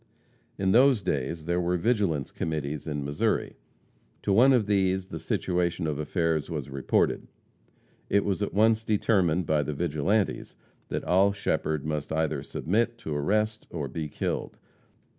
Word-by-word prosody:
In 95 -1 +1
those 125 -1 +5
days 75 +1 -2
there 85 +1 0
were 90 +1 +1
vigilance 95 - 0
committees 75 -1 -3
in 75 -2 -3
Missouri. 70 +1 -1 0.7
To 100 - +1
one 125 +7 +6
of 125 -5 +3
these 95 -2 +1
the - - -6
situation 90 -1 -1
of 75 -2 -2
affairs 80 -1 0
was 70 - -5
reported. 70 -1 0 0.8
It 100 - +2
was 100 0 -1
at 100 - -1
once 110 +1 +3
determined 95 -6 +2
by 75 -1 +2
the 75 +1 -3
vigilantes 85 +7 0 0.3
that - - -4
Oll 95 +3 +4
Shepherd 80 -7 -1
must 75 -1 -3
either 80 -3 0
submit 115 +11 -1
to 80 -10 -5
arrest 105 +8 0
or 75 -5 -4
be 75 +3 -5
killed. - - -3
90 Hz, 150 wpm, -27 LUFS, 75-100 Hz, 0.8 s, one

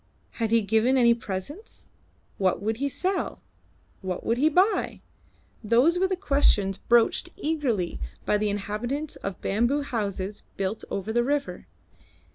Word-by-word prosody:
Had 225 -2 -2
he 230 0 +3
given 225 +6 +3
any 235 -2 +6
presents? 235 - -7 0.5
What 190 -2 +2
would 220 +3 -2
he 280 +3 -1
sell? 370 +6 -1 0.6
What 185 -2 -4
would 230 +2 +1
he 305 +3 +4
buy? 370 +7 +2 0.6
Those 250 +11 +4
were 380 - +3
the 375 - 0
questions 275 - +2
broached 235 -1 +3
eagerly 280 - -1 0.3
by 210 - +2
the 210 0 +1
inhabitants 220 +9 -3
of 195 -2 -5
bamboo 240 +8 +1
houses 205 -5 -3 0.2
built 195 +2 -2
over 200 +3 -3
the 240 +1 +3
river. 285 +2 -2
230 Hz, 140 wpm, -26 LUFS, 205-285 Hz, 0.6 s, any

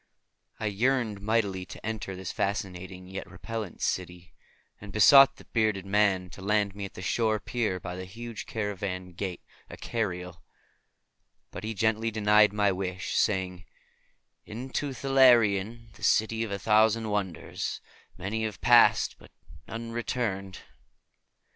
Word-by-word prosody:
I - - -3
yearned 110 0 0
mightily 100 -3 0
to - - -10
enter 110 -3 -4
this 95 -1 -5
fascinating 95 -2 -3
yet 95 -1 -7
repellent 105 +2 -6
city, 90 -1 -3 0.5
and 100 -1 -10
besought 135 +6 +7
the - - -16
bearded 110 -4 0
man 95 -3 +1
to - - -11
land 105 0 +1
me 100 0 -5
at 95 - -10
the 90 - -8
stone 110 +3 +1
pier 105 -3 -2
by 90 0 -6
the 95 0 -6
huge 115 +4 -8
carven 95 -4 -4
gate 90 0 -5 0.3
Akariel; 90 -6 -4 1.1
but - - -8
he 110 +1 -4
gently 110 +2 +1
denied 105 -1 +4
my 105 -1 +2
wish, 95 0 -4
saying, 90 -3 0 0.8
"Into 130 +5 -4
Thalarion, 115 -4 +3
the - - -16
City 110 +1 +2
of 115 - -4
a 100 - -2
Thousand 110 +2 +3
Wonders, 100 -4 -3 0.4
many 100 +5 -3
have 110 -3 -5
passed - - +5
but - - -16 0.4
none 115 +1 -6
returned. 110 -5 -3
105 Hz, 135 wpm, -28 LUFS, 95-115 Hz, 1.1 s, besought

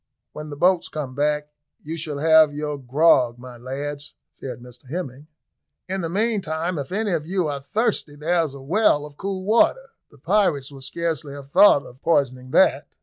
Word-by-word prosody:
"When 150 0 -8
the 145 - -8
boats 180 +2 +2
come 145 -4 -5
back, 150 +1 -1 0.3
you 160 +2 -6
shall 155 -3 -3
have 155 -1 +5
your 150 0 -3
grog, 130 -2 +3
my 125 0 -11
lads," 140 +4 -6 0.2
said 130 - -8 0.3
Hemming; 150 -3 -6 0.6
"in 190 +1 -3
the 165 - -3
meantime, 180 -5 -1
if 140 +2 -6
any 210 +1 -1
of 160 -3 -2
you 185 -2 0
are 145 -1 -3
thirsty, 205 - -1
there's 160 -1 0
a 140 - -10
well 150 -1 +2
of 150 -1 -13
cool 195 -1 -4
water. 365 - +2 0.2
The 145 - -20
pirates 150 -4 +1
will 135 -1 -12
scarcely 155 0 -3
have 140 -1 -11
thought 175 -6 +6
of 125 +3 -15
poisoning 130 -6 0
that." - - +2
150 Hz, 175 wpm, -23 LUFS, 140-175 Hz, 0.6 s, thought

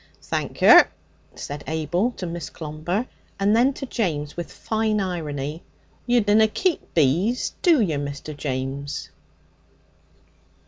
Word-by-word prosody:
'Thank - - -4
yer,' - - +9 0.5
said 145 0 -6
Abel 160 - 0
to 185 - -6
Miss 170 -4 -5
Clomber, 160 +8 -3 0.3
and 200 +2 +3
then 250 +4 +4
to 270 - -6
James 155 - -2
with 175 -1 -6
fine 220 -1 -1
irony: 155 -5 -3 0.5
'You 240 0 +4
dunna 210 +1 +4
keep 350 - -1
bees, 170 - +2
do 335 -6 +5
yer, 165 -10 +1
Mr. 145 +1 -6
James?' 140 0 -4
170 Hz, 125 wpm, -23 LUFS, 145-220 Hz, 0.5 s, yer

